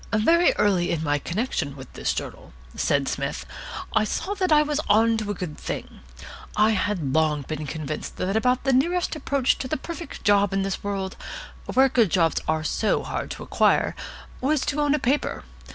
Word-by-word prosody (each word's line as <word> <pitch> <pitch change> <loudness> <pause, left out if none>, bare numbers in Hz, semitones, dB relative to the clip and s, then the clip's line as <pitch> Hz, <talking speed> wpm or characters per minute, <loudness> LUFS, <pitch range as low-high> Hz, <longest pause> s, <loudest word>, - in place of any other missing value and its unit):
"Very 330 +12 +5
early 190 -4 +2
in 165 -2 -1
my 145 -1 +1
connection 170 - -2
with 135 -2 -11
this - - -1
journal," - - -6 0.2
said - - +1
Psmith, - - -3 0.5
"I 215 - +4
saw 380 - -2
that 375 -4 -1
I 300 0 +6
was 300 0 -1
on 225 +2 +5
to 215 -2 -3
a 205 - -1
good 175 -5 -6
thing. - - -6 0.6
I 215 +1 +4
had 185 -9 -1
long 155 -2 +2
been 155 +2 -5
convinced 155 0 -5
that 190 +2 -1
about 250 +3 +2
the 270 - +2
nearest 340 +7 +1
approach 280 -3 +1
to 255 - -3
the - - -1
perfect 335 +4 -8
job 205 -1 +4
in 195 0 +1
this 195 0 -3
world, 195 -2 -3 0.5
where 265 +1 +5
good 235 -6 +3
jobs 165 -2 +2
are 155 0 +1
so 215 +6 0
hard - - -4
to - - -6
acquire, - - +2 0.5
was 285 +2 +2
to 295 +1 -1
own 290 0 +3
a - - +1
paper. 275 +1 0
210 Hz, 190 wpm, -25 LUFS, 170-270 Hz, 0.6 s, I